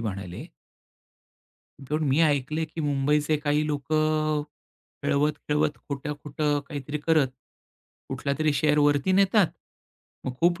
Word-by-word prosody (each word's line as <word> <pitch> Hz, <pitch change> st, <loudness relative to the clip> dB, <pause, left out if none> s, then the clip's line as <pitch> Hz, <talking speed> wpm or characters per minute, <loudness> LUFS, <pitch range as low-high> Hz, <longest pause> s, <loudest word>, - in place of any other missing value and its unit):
म्हणाले 100 Hz, -5 st, -5 dB, 1.4 s
पण 155 Hz, +1 st, +1 dB
मी 135 Hz, +4 st, +3 dB
ऐकलंय, 150 Hz, +1 st, +1 dB
की 160 Hz, +1 st, -7 dB
मुंबईचे 150 Hz, +1 st, +1 dB
काही 150 Hz, +1 st, 0 dB
लोकं 155 Hz, +1 st, +1 dB, 0.6 s
खेळवत-खेळवत, 150 Hz, +1 st, +1 dB
खोटं-खोटं 145 Hz, +1 st, -2 dB
काहीतरी 145 Hz, 0 st, -4 dB
करत, 155 Hz, -4 st, +4 dB, 0.8 s
कुठलातरी 150 Hz, +2 st, 0 dB
शेअर 150 Hz, +1 st, +2 dB
वरती 145 Hz, +4 st, +3 dB
नेतात. 195 Hz, +1 st, +4 dB, 0.8 s
मग 130 Hz, -, -2 dB
खूप 175 Hz, 0 st, +3 dB
150 Hz, 100 wpm, -26 LUFS, 145-155 Hz, 1.4 s, करत